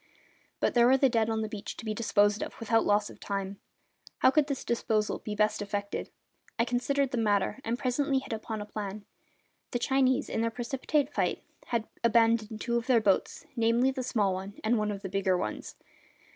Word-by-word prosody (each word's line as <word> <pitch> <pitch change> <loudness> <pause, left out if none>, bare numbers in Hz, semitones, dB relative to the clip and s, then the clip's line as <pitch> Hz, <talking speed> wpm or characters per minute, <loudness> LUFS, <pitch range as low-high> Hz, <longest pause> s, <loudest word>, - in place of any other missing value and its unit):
But - - +1
there 240 -1 +5
were 265 +1 +6
the 270 0 +4
dead 230 -2 +1
on 220 0 0
the - - -2
beach 210 -1 -7
to 230 - -8
be 215 - -1
disposed 205 -1 +2
of, - - -6
without 225 0 +2
loss 205 0 +2
of - - -15
time. 195 -1 -4 0.6
How 260 - +5
could 295 0 +3
this 280 -3 -3
disposal 220 -2 0
be 210 - -5
best 215 0 +1
effected? 200 0 -3 0.5
I 230 - +3
considered 265 +2 0
the 245 - -1
matter, 205 +2 +1
and 230 +2 -1
presently 270 +2 0
hit 265 - -3
upon 220 0 -4
a - - -10
plan. 205 -1 -6 0.6
The 245 - -1
Chinese, 265 +2 +2
in - - -2
their 230 - +1
precipitate 265 +4 -1
flight, - - 0 0.2
had 230 -2 -1 0.2
abandoned 225 -2 +3
two 235 0 0
of 235 - -3
their 250 -3 +5
boats, 205 +7 0
namely 235 +2 +3
the 260 -1 -4
small 210 -6 +1
one 195 +2 -6
and 220 +1 +2
one 210 0 0
of 200 0 -5
the - - -3
bigger 190 -1 +1
ones. 110 -10 -4
225 Hz, 200 wpm, -29 LUFS, 210-245 Hz, 0.6 s, were